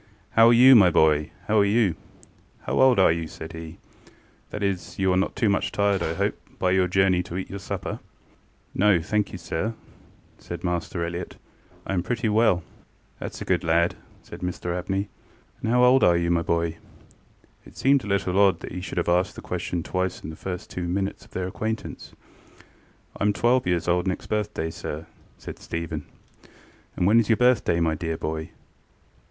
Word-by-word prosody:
ŌĆ£How 115 0 +7
are 120 - +6
you, 130 +3 +8
my 100 -6 +7
boy? 75 -2 +3 0.2
ŌĆöhow 110 - +2
are - - +5
you? 100 -4 +2 0.7
How - - 0
old 130 -2 +6
are 95 -4 +5
you? 80 0 -2
ŌĆØ - - -10
said 80 - -8
heŌĆöŌĆ£that 80 +4 -11
is, 95 -4 -3
you 95 -1 +2
are - - +2
not 95 - 0
too 115 - +1
much 100 -1 +1
tired, 100 -2 +1
I 80 0 -1
hope, - - 0 0.2
by 90 - +1
your 95 -1 +3
journey 90 0 +3
to 90 0 -6
eat 95 - -5
your 100 - -5
supper? 95 - -5 0.8
ŌĆØ - - -7 0.2
ŌĆ£No, - - -11
thank 105 +1 0
you, - - -6
sir, 110 +8 -3
ŌĆØ - - -27
said 85 0 -7
Master 85 -1 -2
Elliott; 85 +1 -5 0.5
ŌĆ£I - - -3
am 90 - +1
pretty 115 +4 -1
well. 105 -5 +3 0.6
ŌĆØ - - -4
ŌĆ£ThatŌĆÖs - - -9
a - - -4
good - - +1
lad, 85 +1 +2
ŌĆØ - - -23
said - - -10
Mr 90 -1 -3
Abney. 95 +3 -2 0.6
ŌĆ£And - - 0
how 125 +1 +4
old 125 +1 +5
are 85 -1 +5
you, 85 0 0
my 85 -1 +2
boy? 85 0 0
ŌĆØ 80 - -15 0.9
It - - -17
seemed 135 0 +3
a - - -7
little 100 -1 0
odd 95 -4 +4
that - - -7
he 90 - -5
should 95 - -7
have 85 - 0
asked 90 +1 +1
the - - -8
question 85 -2 -3
twice 95 +2 -2
in 80 - -6
the - - -9
first 90 +2 -6
two 90 -1 -4
minutes 95 +2 -3
of - - -21
their 95 - -3
acquaintance. 110 +4 -5 1.0
ŌĆ£IŌĆÖm 105 0 +1
twelve 120 -2 +2
years 90 -2 0
old 90 +1 +1
next 95 - -2
birthday, 105 -6 -2
sir, 75 -1 -6
ŌĆØ - - -15 0.4
said - - -8
Stephen. 80 -3 -5 0.9
ŌĆ£And 90 - +1
when 110 +5 +5
is 115 - 0
your 110 - +4
birthday, 125 -9 +3
my 80 -1 +1
dear 80 +1 -3
boy? 80 0 -4
90 Hz, 205 wpm, -25 LUFS, 85-105 Hz, 1.0 s, you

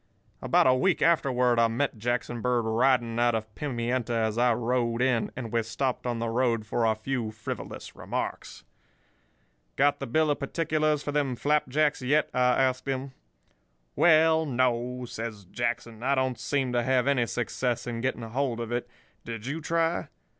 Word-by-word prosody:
"About - - +3
a 130 - +6
week 180 +8 +2
afterward 125 -7 +3
I 115 - +5
met 120 +4 -1
Jackson 120 +1 -2
Bird 125 -1 +1
riding 120 0 +2
out 120 -1 +3
of 110 -1 -4
Pimienta 120 -3 -2
as 110 -1 0
I 120 +1 +3
rode 120 0 0
in, 125 -3 +1
and 120 -4 -6
we 115 0 +2
stopped 125 +3 -2
on 120 -1 -1
the 115 0 -2
road 115 -1 0
for 115 +2 0
a 110 -1 +2
few 115 0 -3
frivolous 110 0 -7
remarks. - - -5 1.1
"'Got 145 +1 +3
the - - -4
bill 155 +5 +2
of 145 - -1
particulars 155 0 0
for 145 - -3
them 140 -3 0
flapjacks 150 +1 +1
yet?' 145 +4 +1
I 125 +1 +3
asked 130 0 -1
him. 135 0 -2 0.8
"'Well, 160 -1 +5
no,' 125 -1 0
says 110 -4 -6
Jackson. 115 +2 -3
'I 135 +3 +2
don't 130 -1 -1
seem 135 -3 -1
to 120 - +2
have 130 0 +2
any 130 -4 +2
success 120 +1 -2
in 120 -1 -4
getting 130 -2 -2
hold 120 +1 -2
of 115 0 -4
it. 120 0 -2 0.3
Did 115 -1 -7
you 150 +5 -3
try? 165 +2 0
125 Hz, 170 wpm, -27 LUFS, 115-140 Hz, 1.1 s, a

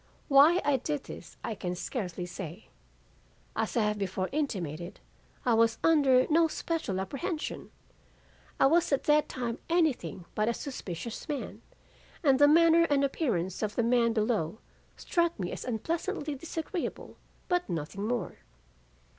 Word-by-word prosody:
"Why 295 +6 +7
I 285 -2 +3
did 290 +2 -3
this - - -10
I 225 - -2
can 180 -3 -4
scarcely 180 -3 -4
say. 180 +2 -8 0.9
As - - -1
I 225 - +4
have 210 0 0
before 190 -1 -2
intimated, 180 - -3 0.5
I 245 - +3
was 225 0 +3
under 275 -6 +5
no 325 +1 +4
special 315 - -2
apprehension. 305 - -4 0.9
I - - +6
was 330 +5 +3
at 275 - +2
that 300 0 +3
time 240 -2 -3
anything 275 - 0
but 215 +1 +1
a 235 - 0
suspicious 235 - -6
man, 290 -2 -4 0.6
and 275 -3 +4
the 290 - +8
manner 335 +2 +6
and 285 -3 +2
appearance 215 - -1
of 210 -2 -2
the 235 - +2
men 235 0 +3
below 215 -5 0 0.4
struck 340 -5 0
me 180 -2 -2
as - - -5
unpleasantly 310 - -2
disagreeable 325 +4 -5 0.3
but 355 0 0
nothing 170 +5 -3
more. 245 0 -3
250 Hz, 145 wpm, -29 LUFS, 200-310 Hz, 0.9 s, the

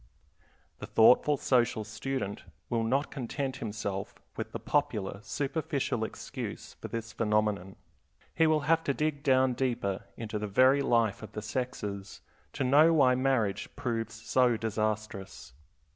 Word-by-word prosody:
The - - -7
thoughtful 125 +6 +5
social 120 -5 +2
student 110 0 -4 0.3
will 115 -1 +1
not 135 +6 0
content 135 0 -3
himself 105 -4 -4 0.2
with - - -5
the - - -4
popular 100 -1 -1
superficial 140 -2 -2
excuse 110 - -6
for - - -5
this 115 -1 -5
phenomenon. 105 -3 0 0.6
He 160 0 +4
will 155 -1 +3
have 165 +3 +2
to 140 - 0
dig 150 -2 -1
down 130 -2 +3
deeper 120 -7 -1
into 110 -2 -4
the 105 - -3
very 130 +7 +5
life 115 -6 +2
of 110 -1 -10
the 105 - -5
sexes 105 -4 -4 0.3
to - - -2
know 145 +6 +6
why 130 -4 +5
marriage 125 -6 0
proves 115 -2 -3
so 120 +1 +2
disastrous. 110 - -3
115 Hz, 140 wpm, -30 LUFS, 105-135 Hz, 0.6 s, know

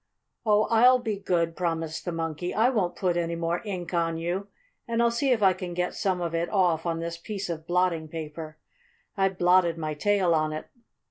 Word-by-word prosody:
"Oh, 210 0 +5
I'll 250 +3 +6
be 220 -5 -3
good!" 170 -4 0
promised 165 -3 -2
the 175 - -2
Monkey. 165 +1 -3
"I 230 +5 +4
won't 190 -8 0
put 180 -3 0
any 170 -1 -1
more 170 +1 -1
ink 185 -5 -5
on 165 -1 0
you, 175 +4 -3 0.4
and 230 0 -1
I'll 235 0 +4
see 270 +4 0
if 225 -4 +2
I 190 -1 +6
can 180 -1 -6
get 180 0 -1
some 185 -2 -1
of 170 -1 -2
it 170 +1 -1
off 175 -5 +2
on 165 0 -1
this 170 0 -4
piece 195 0 -4
of 160 0 -6
blotting 175 -3 +1
paper. 155 0 -7 0.6
I 195 -2 +3
blotted 180 -2 +3
my 155 -1 -3
tail 190 +2 +2
on 155 -1 +1
it." 155 - -5
175 Hz, 205 wpm, -27 LUFS, 165-195 Hz, 0.6 s, I'll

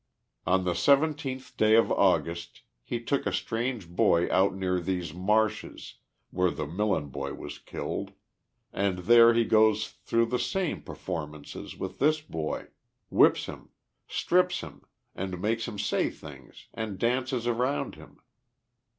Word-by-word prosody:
On 95 +2 +3
the 90 - 0
17th 140 - +1
day 110 0 +5
of 115 - +4
August 85 +1 +1 0.2
he 120 - -3
took 140 +4 -1
a - - 0
strange 115 -4 -2
boy 85 0 +3
out 95 +1 +3
near 90 -1 0
these 90 -3 -3
marshes, 105 +5 -1 0.3
where 90 0 +2
the 75 - -4
Millen 90 -2 -1
boy 70 +1 -5
was 75 0 -8
killed, - - -5 0.6
and 100 -2 0
there 115 0 +7
he 115 0 +3
goes 110 -1 +4
through 115 0 0
the 125 +2 -1
same 190 -4 -1
performances 75 -4 -7
with - - -6
this 155 +2 +3
boy; 80 - -5 0.4
whips - - +5
him, - - -10 0.4
strips 180 0 +1
him 70 -2 -10 0.3
and 95 -1 -4
makes 110 +4 -1
him 105 - -6
say - - 0
things - - -13
and 110 -4 -4
dances 125 +2 0
around 125 +4 0
him. - - -15
105 Hz, 140 wpm, -28 LUFS, 90-120 Hz, 0.6 s, there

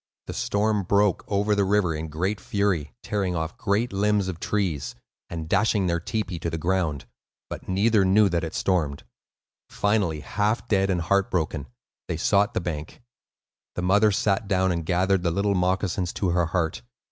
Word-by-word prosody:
The - - -6
storm 105 0 0
broke 100 +1 +2
over 105 +1 +1
the 100 -1 +2
river 95 -3 +2
in 80 +1 -4
great 95 +7 -2
fury, 95 -8 0
tearing 95 -4 -1
off 80 0 -3
great 105 +3 0
limbs 100 0 +1
of 85 -3 -5
trees, 90 -13 -2 0.3
and 80 -2 -5
dashing 100 +2 +2
their 85 -1 +1
tepee 95 -1 -3
to 85 - -2
the 80 - -3
ground; 85 -4 -1 0.5
but - - -7
neither 100 +2 +3
knew 100 +3 +5
that 85 -2 -1
it 80 - -5
stormed. 80 -7 0 0.7
Finally, 100 -7 0
half 105 +8 -1
dead, 95 -3 +2
and 90 -3 +1
heart 100 +3 +1
broken, 80 -5 -2 0.4
they 80 - -2
sought 100 +5 +2
the - - +2
bank. 80 +4 -6 0.7
The 90 - -3
mother 100 +4 +4
sat 100 0 0
down 95 -1 +2
and 85 -2 -3
gathered 95 +1 +2
the 85 - +1
little 100 +4 +1
moccasins 90 0 0
to 95 - -1
her 85 -1 +2
heart. 80 -1 -1
95 Hz, 175 wpm, -25 LUFS, 85-100 Hz, 0.7 s, knew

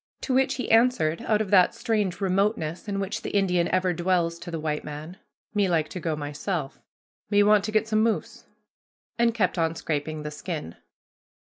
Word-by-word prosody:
To 265 - -2
which 265 +1 +2
he 255 - -3
answered 225 -9 +3
out 215 -1 +3
of 205 -2 -3
that 185 -3 +5
strange 210 -6 -1
remoteness 195 -3 0
in 200 -1 -2
which 200 +3 -3
the - - -4
Indian 180 -3 +2
ever 185 -1 +1
dwells 170 -1 0
to - - -8
the 165 -1 -4
white 150 -1 -2
man, 150 +5 -8 0.4
"Me 205 -3 +2
like 160 -3 +1
to 185 - -6
go 160 -1 -2
myself; 150 +1 -4 0.5
me 205 0 +4
want 210 -1 +5
to 215 - -3
get 215 0 +1
some 215 -1 +2
moose"; 225 0 -1 0.7
and 235 0 +4
kept 185 -5 +1
on 165 0 +1
scraping 155 -1 -3
the 150 - -5
skin. 150 - -6
185 Hz, 190 wpm, -26 LUFS, 160-210 Hz, 0.7 s, that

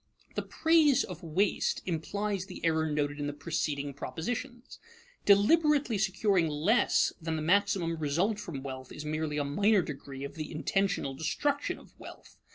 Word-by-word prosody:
The - - -1
praise 320 -4 +3
of 180 -4 -8
waste 180 +5 0
implies 195 +3 -2
the 180 -3 -7
error 160 -1 +2
noted 145 0 -1
in 145 - -2
the 145 - -3
preceding 145 -1 -2
propositions. 240 - -5 0.5
Deliberately 270 +3 +4
securing 195 -2 +2
less 160 +11 +2
than 165 0 -2
the 155 - -3
maximum 185 -1 +2
result 170 +8 0
from 150 -9 -6
wealth 130 -1 -7
is 150 - -7
merely 155 0 -2
a 145 - +1
minor 200 +7 +3
degree 135 -2 -7
of 140 - -6
the 155 -2 -6
intentional 180 -2 0
destruction 285 - -1
of - - -17
wealth. - - -13
165 Hz, 155 wpm, -30 LUFS, 150-205 Hz, 0.5 s, Deliberately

